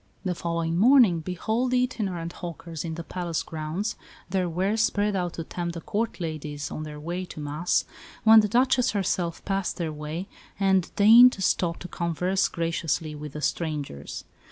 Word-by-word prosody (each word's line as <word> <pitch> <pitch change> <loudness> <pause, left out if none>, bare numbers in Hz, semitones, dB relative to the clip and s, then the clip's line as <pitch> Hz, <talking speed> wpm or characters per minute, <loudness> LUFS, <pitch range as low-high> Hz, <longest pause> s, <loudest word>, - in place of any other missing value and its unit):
The 180 - +1
following 170 -1 -2
morning 230 -6 +6
behold 220 +9 -1
the 250 0 +3
itinerant 185 -9 -3
hawkers 170 -2 -6
in 165 -2 -4
the 170 - -6
palace 175 -2 -3
grounds, 160 +6 -3 0.3
their 185 -1 0
wares 195 +6 0
spread 205 -2 +1
out 175 -2 -1
to 165 - -5
tempt 170 +1 -4
the 170 - -5
Court 220 +4 -2
ladies 155 -3 -4
on - - -5
their 150 -1 -7
way 175 +4 -4
to 165 - -10
Mass, 150 +4 0 0.4
when 220 0 +9
the 210 - +3
Duchess 250 +2 +3
herself 180 -4 -1
passed 195 -2 -1
their 165 -3 -2
way 155 +5 -5 0.3
and 190 -2 +2
deigned 235 +5 +8
to 195 - -5
stop 170 -2 +1
to 180 - -6
converse 180 +3 0
graciously 165 -2 -2
with 150 -1 -8
the 150 - -6
strangers. 150 - -3
175 Hz, 175 wpm, -26 LUFS, 160-200 Hz, 0.4 s, when